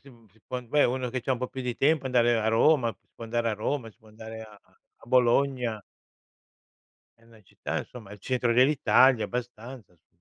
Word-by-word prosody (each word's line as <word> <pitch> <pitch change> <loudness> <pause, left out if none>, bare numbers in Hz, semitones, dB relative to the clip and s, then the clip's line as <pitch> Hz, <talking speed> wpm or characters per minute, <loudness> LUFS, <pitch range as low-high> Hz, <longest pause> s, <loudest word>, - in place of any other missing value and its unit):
si 140 - -16 0.2
si 110 - -28
può 125 0 -4
beh, 145 +5 +2
uno 125 0 -1
che 130 0 -3
c'ha 130 - -1
un 125 - -2
po' 125 - -4
più 130 - -7
di 125 -1 -4
tempo 145 -1 +1
andare 120 -2 +3
a 110 - 0
Roma, 120 +2 +3
si - - -45
può 115 - -9
andare 115 0 -1
a - - -2
Roma, 115 +2 -3
si 105 - -29
può 110 - -21
andare 110 +1 -10
a 105 -2 -14 0.4
a - - -16
Bologna. 125 -2 +1 1.4
È - - -28
una 115 -1 -20
città - - -5
insomma 110 -5 -10
al 105 - -11
centro 125 +2 -1
dell'Italia, 130 -2 +4
abbastanza, 120 -2 -7
su 85 +1 -40
120 Hz, 205 wpm, -27 LUFS, 110-130 Hz, 1.4 s, dell'Italia